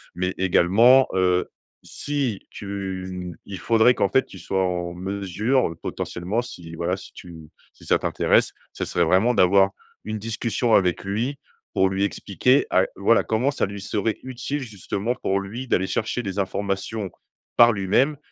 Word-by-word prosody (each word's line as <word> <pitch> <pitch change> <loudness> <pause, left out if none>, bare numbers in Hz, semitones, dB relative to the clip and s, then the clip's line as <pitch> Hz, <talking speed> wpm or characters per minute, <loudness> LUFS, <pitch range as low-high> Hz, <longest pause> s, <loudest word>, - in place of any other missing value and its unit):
Mais 90 +1 -1
également, 105 +8 +5
heu, 90 -1 +2 0.3
si 140 -8 -3
tu, 95 -2 -5
mmh 90 -2 -6
il 100 -2 -7
faudrait 115 +4 +4
qu'en 100 - +1
fait 130 - +2
tu 95 - -13
sois 95 +2 -1
en 90 -1 -2
mesure, 100 +4 -1
potentiellement, 95 +7 -3
si 85 -8 -9
voilà, 85 +3 -1
si - - -12
tu 80 -3 -12 0.2
si - - -18
ça - - +3
t'intéresse. - - +2 0.2
Ce - - -4
serait 85 -1 +1
vraiment 95 +9 +3
d'avoir 95 -1 +5 0.3
une 110 0 -4
discussion 115 +2 -1
avec 90 0 +1
lui 120 +8 -2 0.4
pour 95 - +3
lui 95 +1 -1
expliquer, 100 - +1
à 95 - +3
voilà, 100 +4 +3
comment 115 +5 +1
ça 140 - 0
lui 100 +1 -7
serait 105 +2 -2
utile 130 +3 -4
justement, 110 0 -3
pour 95 -4 -1
lui, 115 +7 -7
d'aller 95 -3 +2
chercher 115 +2 -1
les 100 -3 -5
informations 100 +1 -2 0.4
par 120 0 +7
lui-même 115 +9 +1
100 Hz, 160 wpm, -23 LUFS, 95-115 Hz, 0.4 s, par